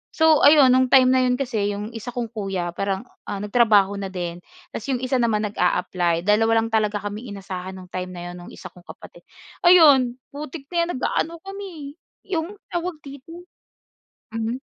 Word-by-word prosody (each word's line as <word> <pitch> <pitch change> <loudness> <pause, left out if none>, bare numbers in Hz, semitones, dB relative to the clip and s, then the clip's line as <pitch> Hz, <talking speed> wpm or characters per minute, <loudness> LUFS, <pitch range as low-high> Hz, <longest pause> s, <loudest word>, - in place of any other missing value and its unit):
So, 320 -2 +4
ayun 285 -3 +7
no'ng 255 0 +4
time 255 -1 +6
na 260 0 +4
'yon 250 - +2
kasi 235 -6 -1
'yong 210 +2 -6
isa 230 +1 -7
kong 235 -2 -3
kuya 195 -6 -3
parang, 195 +3 -3 0.2
ah, - - -3
nagtrabaho 205 -3 +3
na 195 - -4
din 175 -2 -5 0.3
tapos 225 - -6
'yong 255 -2 -1
isa 255 0 0
naman 225 -3 +1
nag-a-apply. 175 -2 0
Dalawa 225 +3 +3
lang 225 - -4
talaga 215 -1 +1
kaming 205 +1 -6
inasahan 190 -1 -7
no'ng 185 -1 -13
time 185 0 -4
na 175 0 -7
'yon - - -10
no'ng - - -11
isa - - -10
kong 180 -1 -19
kapatid. - - -15 0.4
Ayun 290 -9 +6 0.2
putik 290 0 -7
na - - -7
'yan - - -9
nag-aano 330 +5 -1
kami 385 -8 -8
eh, 350 +3 -14
'yong 340 +6 -6 0.2
tawag 350 0 -3
dito 285 +5 -11 0.9
mhm. 225 +2 -3
225 Hz, 185 wpm, -22 LUFS, 195-280 Hz, 0.9 s, ayun